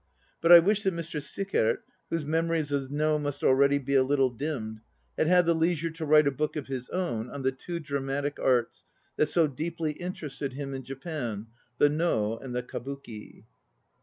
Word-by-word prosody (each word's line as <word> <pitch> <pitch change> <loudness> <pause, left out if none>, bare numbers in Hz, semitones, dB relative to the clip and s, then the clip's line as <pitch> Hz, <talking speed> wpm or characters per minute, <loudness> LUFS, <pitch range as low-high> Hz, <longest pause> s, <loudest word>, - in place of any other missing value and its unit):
But 165 - +2
1 170 -1 +10
wish 210 +1 +3
that 190 -4 0
Mr. 165 -2 -4
Sickert, 150 - 0 0.3
whose 165 -3 -2
memories 160 -1 0
of 140 -2 -1
No 150 +1 +1
must 145 -2 -4
already 140 +2 +5
be 140 0 -3
a 135 - +6
little 135 -1 +2
dimmed, 115 -5 -4 0.3
had 155 - +1
had 180 0 +5
the 170 - +4
leisure 165 0 0
to 160 0 -5
write 150 0 +6
a 140 - +3
book 150 +4 -2
of 150 - -3
his 130 -2 -5
own 125 -11 -2
on 140 -1 -6
the 130 - +2
two 170 +6 -6
dramatic 140 -1 -3
arts 120 -9 +1 0.3
that 150 - +3
so 170 -2 +4
deeply 160 +3 -3
interested 150 -5 -5
him 140 0 -5
in 135 - -4
Japan, 135 - -5 0.3
the 145 - +6
No 145 -8 0
and 125 -2 -7
the 125 - -1
Kabuki. 125 -3 -8
145 Hz, 190 wpm, -28 LUFS, 130-165 Hz, 0.3 s, 1